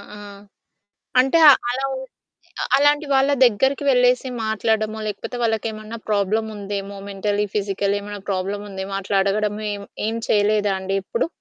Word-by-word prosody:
ఆ! - - -10 1.0
అంటే 270 +6 +4 0.3
అలా 265 +2 -1
ఉం 260 - -4 0.8
అలాంటి 290 +2 +3
వాళ్ళ 270 +1 +3
దగ్గరికి 265 +5 +1
వెళ్ళేసి 250 0 +3 0.2
మాట్లాడడమో, 220 0 0
లేకపోతే 210 +4 -5
వాళ్ళకి 225 0 0
ఏమన్నా 215 +1 -8
ప్రాబ్లమ్ 215 +2 +1
ఉందేమో 200 0 -5
మెంటల్ 205 +1 -1
ఫిజికల్ 200 0 0
ఏమన్నా 205 -1 -8
ప్రాబ్లమ్ 195 +2 -2
ఉందేమో 195 0 -6
అట్లా 195 0 -1
అడగడము 210 +1 -1
ఏం 200 - -7 0.2
ఏం 225 +1 -2
చేయలేదా 205 -1 +2
అండి 195 +1 -2
ఇప్పుడు? 470 - -1
210 Hz, 135 wpm, -21 LUFS, 200-240 Hz, 1.0 s, అంటే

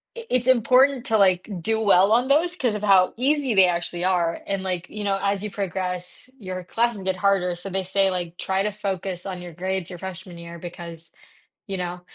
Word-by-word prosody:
i 470 0 -7
it's 255 0 +2
important 255 +1 +4
to, 225 -3 +3
like, 185 0 +3
do 220 +4 +1
well 200 -1 +4
on 245 +3 +3
those 335 +5 +3
'cause 245 -9 0
of 210 - -5
how 190 -3 +5
easy 275 -1 +1
they 190 -1 +7
actually 175 0 -2
are 175 -3 +1
and 195 -1 -2
like, 180 -2 -3
you 210 -1 -6
know, 195 -1 0
as 200 0 0
you 210 - -3
progress 185 +2 -4
your 185 -3 -6
classes 230 +4 0
get 190 0 0
harder, 185 -2 +1
so 180 +3 -6
they 190 0 -2
say, 195 +1 +2
like, 175 -1 -4
try 190 0 -1
to 210 - -1
focus 190 -3 -4
on 185 -2 -5
your 175 -2 -9
grades 185 +1 -3
your 180 -2 -8
freshman 185 -1 -8
year 170 0 -9
because, 170 -1 -9 0.6
you 195 - -4
know 180 -1 -4
190 Hz, 210 wpm, -23 LUFS, 180-210 Hz, 0.6 s, they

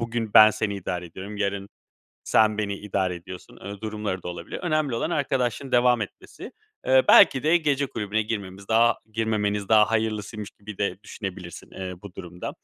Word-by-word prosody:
"Bugün 115 -2 -3
ben 110 0 +10
seni 105 -1 -2
idare 90 -2 -4
ediyorum, 95 +5 -9
yarın 100 -1 -2 0.6
sen 110 -1 +3
beni 100 -2 -2
idare 95 -3 -2
ediyorsun." 90 +1 -11
ııı, 100 0 -9
durumları 105 -4 -4
da - - -6
olabilir. 90 0 -6
Önemli 155 -7 0
olan 115 - -1
arkadaşlığın 135 -4 -1
devam 125 -1 +4
etmesi. 100 - -8 0.4
Iıı, 130 0 +5
belki 135 +1 +7
de 160 +3 +4
gece 145 -4 0
kulübüne 110 -1 -2
girmemiz 100 -3 -5
daha 115 +1 +4 0.2
girmemeniz 105 -2 -1
daha 110 -1 +5
hayırlısıymış 110 -1 -2
gibi 105 -1 -11
de 100 -2 -1
düşünebilirsin, 95 -5 -8
eee, 95 -1 -6
bu 100 -3 -11
durumda. 90 -1 -7
105 Hz, 165 wpm, -25 LUFS, 100-115 Hz, 0.6 s, ben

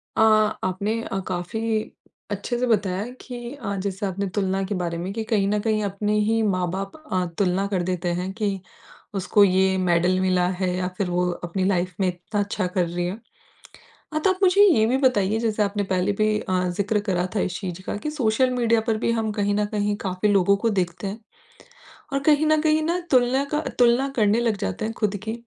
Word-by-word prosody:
अ, - - +2 0.4
आपने 200 +5 -1
अ, 195 - -3
काफ़ी 215 +5 -2 0.4
अच्छे 205 +4 -3
से 250 - +1
बताया 200 -4 +1 0.2
कि 240 0 -7
अ, 240 -8 -4
जैसे 200 +1 -3
आपने 195 +1 -2
तुलना 195 -1 0
के 200 +2 -3
बारे 170 -2 -2
में 180 +3 -4
कि 225 +1 -3
कहीं 210 -3 +1
न 210 +1 +1
कहीं 215 -1 0
अपने 205 +1 -1
ही 225 +2 +2
माँ 185 -4 0
बाप 195 +1 -4 0.2
अ, 185 -1 +1
तुलना 195 0 +1
कर 190 -3 -1
देते 180 0 -2
हैं 185 +1 -4
कि 200 -2 -2 0.6
उसको 200 +2 +3
ये 190 0 +3
मेडल 180 0 +2
मिला 185 -1 +2
है 185 -2 0
या 180 0 -1
फिर 195 -3 -1
वो 180 0 +1
अपनी 175 +2 -2
लाइफ़ 180 -2 0
में 190 - +2
इतना 180 +4 -3
अच्छा 205 -1 -2
कर 180 0 0
रही 175 +1 -2
है। 185 +5 -4 0.9
हाँ, 310 - 0
तो 385 - +3
आप 370 - -14
मुझे 380 +2 +5
ये 285 - +5
भी 255 +3 +2
बताइए 225 -6 +2
जैसे 220 -2 +1
आपने 205 0 -1
पहले 190 0 0
भी 215 +1 +1
अ, 185 -3 -1
ज़िक्र 205 +1 +1
करा 180 -1 +1
था - - +2
इस 185 -1 -2
चीज़ 185 -2 -5
का - - -3
कि 300 +8 -4
सोशल 255 -3 +2
मीडिया 230 -2 +2
पर 225 -1 +1
भी 230 - 0
हम 225 -2 -1
कहीं 205 -1 0
न 210 0 +1
कहीं 205 0 0
काफ़ी 185 +2 0
लोगों 200 0 +4
को 230 +3 0
देखते 185 -1 -2
हैं 200 +4 -5 0.9
और 275 - +2
कहीं 300 +1 +4
न 310 0 +4
कहीं 310 0 +3
ना 340 +3 0
तुलना 255 +1 +3
का 300 - +1 0.2
तुलना 245 +2 +4
करने 215 0 +3
लग 230 -3 +1
जाते 95 - -3
हैं 225 - -3
खुद 210 -2 0
की। 220 0 -3
205 Hz, 215 wpm, -24 LUFS, 185-225 Hz, 0.9 s, मुझे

